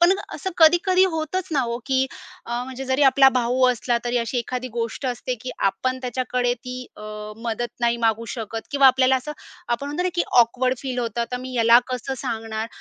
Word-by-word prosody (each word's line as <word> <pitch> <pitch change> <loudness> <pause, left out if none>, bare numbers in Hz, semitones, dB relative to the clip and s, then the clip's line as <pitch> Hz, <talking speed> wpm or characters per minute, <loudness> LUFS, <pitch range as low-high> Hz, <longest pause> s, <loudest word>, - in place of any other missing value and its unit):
पण 345 +2 +6 0.2
असं 380 - -4
कधी-कधी 355 +3 +5
होतच 345 +4 -3
ना 280 - +2
हो, 235 -1 -2
की 265 -1 +2 0.4
अ, 240 +1 -2
म्हणजे 265 +1 -7
जरी 265 +2 +1
आपला 270 0 +7
भाऊ 250 +2 +1
असला, 240 0 0
तरी 240 0 -1
अशी 235 +2 -2
एखादी 250 +1 -4
गोष्ट 230 +3 -3
असते, 250 0 -2
की 255 - -5
आपण 255 +7 0
त्याच्याकडे 250 0 -1
ती 250 +1 -8
अ, - - -11 0.3
मदत 235 +1 -3
नाही 235 0 +2
मागू 225 +1 0
शकत, 225 -1 -5
किंवा 280 -1 +5
आपल्याला 260 0 +5
असं 280 +4 -5 0.4
आपण 240 +4 -1
म्हणतो 295 +5 -2
ना, 365 - +1
की 345 - +2 0.2
ऑकवर्ड 255 +2 +3
फील 255 -2 -4
होतं, 235 -1 -2
"आता 240 +1 -2
मी 255 +1 -7
ह्याला 235 -1 +6
कसं 255 +1 -4
सांगणार?" 225 -3 -4
250 Hz, 195 wpm, -23 LUFS, 235-265 Hz, 0.4 s, आपला